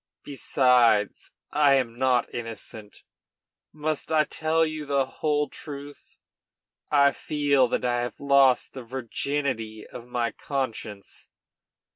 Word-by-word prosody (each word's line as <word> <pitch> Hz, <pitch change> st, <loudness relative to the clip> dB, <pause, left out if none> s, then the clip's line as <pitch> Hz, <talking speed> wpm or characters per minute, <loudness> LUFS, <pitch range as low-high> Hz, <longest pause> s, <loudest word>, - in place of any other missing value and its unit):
Besides, 125 Hz, -6 st, +2 dB, 0.2 s
I 145 Hz, -2 st, +4 dB
am 125 Hz, -4 st, 0 dB
not 125 Hz, 0 st, +1 dB
innocent. 115 Hz, -2 st, -7 dB, 0.7 s
Must 155 Hz, 0 st, -3 dB
I 155 Hz, -1 st, +4 dB
tell 160 Hz, +1 st, +1 dB
you 155 Hz, -2 st, -5 dB
the 140 Hz, -1 st, +2 dB
whole 150 Hz, +2 st, -1 dB
truth? 145 Hz, -1 st, -10 dB, 0.7 s
I 140 Hz, -1 st, +5 dB
feel 145 Hz, -3 st, +1 dB
that 125 Hz, -, -1 dB
I 120 Hz, 0 st, +1 dB
have 120 Hz, -, -5 dB
lost 140 Hz, -3 st, +3 dB
the 130 Hz, -, -7 dB
virginity 120 Hz, -2 st, -3 dB
of 120 Hz, -, -11 dB
my 120 Hz, -1 st, -1 dB
conscience." 115 Hz, -7 st, -5 dB
135 Hz, 115 wpm, -26 LUFS, 120-145 Hz, 0.7 s, I